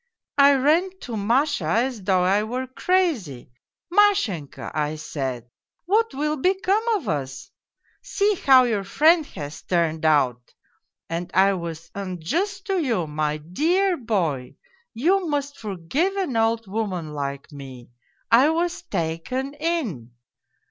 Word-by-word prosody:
I 280 0 +7
ran 330 +8 +2
to 235 - -6
Masha 235 - +1
as 235 +5 0
though 185 -1 +2
I 195 +3 +3
were 250 +4 -3
crazy: 260 - -1 0.2
" 345 - -20
Mashenka," 380 - +2
I 150 0 -1
said, 130 -6 -5 0.2
" - - -57
what 445 +5 +2
will 300 +2 -1
become 380 +6 +1
of 335 - -4
us! 135 -4 -4 0.5
See 425 -4 +1
how 265 -8 +6
your 220 -5 0
friend 310 - +3
has 145 0 -8
turned 165 -3 0
out! 130 -6 +1 0.2
" - - -58
and 170 +1 -3
I 195 +1 +5
was 165 -2 -6
unjust 200 - -3
to 385 -3 0
you, 230 - 0
my 150 0 -2
dear 330 - +1
boy, 175 - -2 0.4
You 360 +9 +2
must 285 -1 -3
forgive 215 - -2
an 365 -11 -2
old 225 0 +1
woman 190 -6 -3
like 140 +1 -5
me, 130 -4 -11 0.4
I 255 +6 +6
was 345 +2 -1
taken 200 - -3
in 290 - -2
225 Hz, 140 wpm, -23 LUFS, -, 0.5 s, I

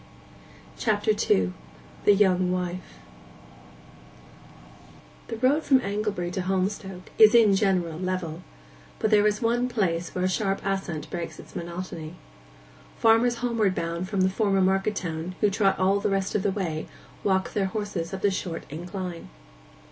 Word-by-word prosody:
CHAPTER 215 0 +1
II—THE 90 - 0
YOUNG 185 -2 +3
WIFE 180 - -4 2.3
The 230 - -5
road 260 +6 +3
from 265 -2 +5
Anglebury 200 -4 -2
to 185 - -2
Holmstoke 190 0 -3
is 220 +1 +8
in 215 -4 +6
general 180 -5 +1
level; 185 -3 -3 0.6
but 220 - 0
there 210 0 +5
is 210 +2 -1
one 240 +2 +1
place 175 -8 -1
where 185 0 0
a - - +3
sharp 195 +1 0
ascent 190 -6 -2
breaks 170 -2 -5
its - - -13
monotony. 170 -1 -6 0.8
Farmers 230 +2 +4
homeward 220 -6 +1
bound 170 +2 -3
from 195 -2 0
the 185 - +4
former 195 -1 +1
market 195 +2 +2
town, 165 0 -4
who 210 - +3
trot 195 -1 +2
all 195 +2 +2
the 200 - 0
rest 195 0 -1
of 210 - +1
the 200 - +1
way, 175 -6 -3 0.4
walk 190 -1 +1
their 200 - +1
horses 190 -4 -4
up 190 -1 -6
this 200 -1 +3
short 175 -3 -4
incline. 175 +2 -6
190 Hz, 150 wpm, -26 LUFS, 175-210 Hz, 2.3 s, is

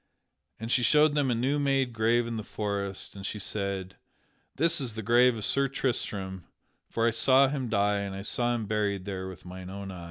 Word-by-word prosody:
And 115 +1 -4
she 125 - +3
showed 150 +5 +4
them 145 -3 +1
a 120 - +2
new 135 +5 0
made 135 -3 +1
grave 115 +2 +2
in 115 0 -4
the 110 - -4
forest, 100 -2 -4
and 100 - -8
she 105 - -4
said: 100 -2 -3 0.6
"That 165 +1 +3
is 120 -5 -4
the 110 - -5
grave 120 +2 +4
of 105 - -4
Sir 140 0 +2
Tristram, 100 -8 -3 0.4
for 115 - 0
I - - +3
saw 130 +3 +5
him 135 -4 -3
die 105 -1 +2
and 100 -1 -4
I 95 - -6
saw 120 +3 0
him 115 -2 -3
buried 100 -2 -1
there 95 -2 -4
with 95 -1 -10
mine 90 0 -8
own 100 0 -7
eyes." 90 - -8
110 Hz, 215 wpm, -28 LUFS, 100-125 Hz, 0.6 s, saw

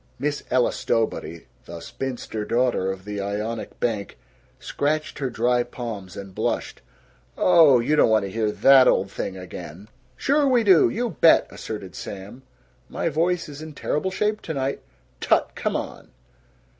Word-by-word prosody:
Miss 145 +2 -2
Ella 125 -1 +2
Stowbody, 110 -7 -2 0.2
the 85 0 -8
spinster 120 0 -5
daughter 120 -5 +1
of 95 0 -8
the 105 -1 -4
Ionic 105 +3 -4
bank, 105 - -2 0.4
scratched 155 +2 -2
her 135 -2 -1
dry 120 +1 +1
palms 110 -7 -7
and 100 -1 -8
blushed. - - -3 0.6
"Oh, 160 -8 +6
you 135 +6 +1
don't 150 - +4
want 110 -2 +3
to 95 - -6
hear 110 0 0
that 135 +3 +6
old 95 - +2
thing 95 - -5
again." 90 +1 -9 0.3
"Sure 285 +1 +2
we 250 -3 +3
do! 190 -6 +6
You 235 +1 -2
bet!" 165 - +5
asserted 100 -5 -7
Sam. 100 +5 -8 0.5
"My - - -2
voice 170 +3 0
is 145 0 -9
in 155 -1 -8
terrible 150 +5 -2
shape 210 +3 -1
tonight." 140 -4 -3 0.4
"Tut! - - +2
Come - - -2
on!" - - -5
120 Hz, 155 wpm, -23 LUFS, 100-155 Hz, 0.6 s, Oh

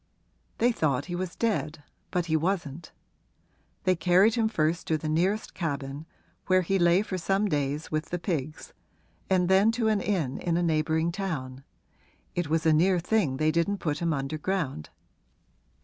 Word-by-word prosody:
They 240 +2 +3
thought 140 - 0
he 175 - -4
was 180 0 -4
dead, 165 -9 -1 0.3
but 180 -1 -1
he 160 -2 0
wasn't; 165 -2 -2 0.9
they 185 -1 +3
carried 180 +6 +4
him 225 -2 +1
first 165 -4 0
to 160 - +1
the 155 - -5
nearest 185 +8 0
cabin, 145 -2 -4 0.4
where 185 0 +4
he 195 +3 0
lay 175 +3 +4
for 185 -3 -4
some 195 +4 +1
days 145 -2 -2
with 155 0 -1
the 175 - -3
pigs, 155 -5 -4 0.6
and 185 -2 +3
then 195 +4 +5
to 225 -1 +1
an 210 -2 +1
inn 165 -12 -1
in 170 -1 0
a 175 - +1
neighbouring 160 0 +1
town 140 -9 -4 0.7
it 175 -4 -2
was 160 0 0
a 160 - +5
near 180 +4 +4
thing 175 -6 0
they 155 +2 +2
didn't 170 +5 0
put 150 -5 -2
him 170 -1 0
under 140 +1 -3
ground. 155 - -2
170 Hz, 170 wpm, -27 LUFS, 155-190 Hz, 0.9 s, then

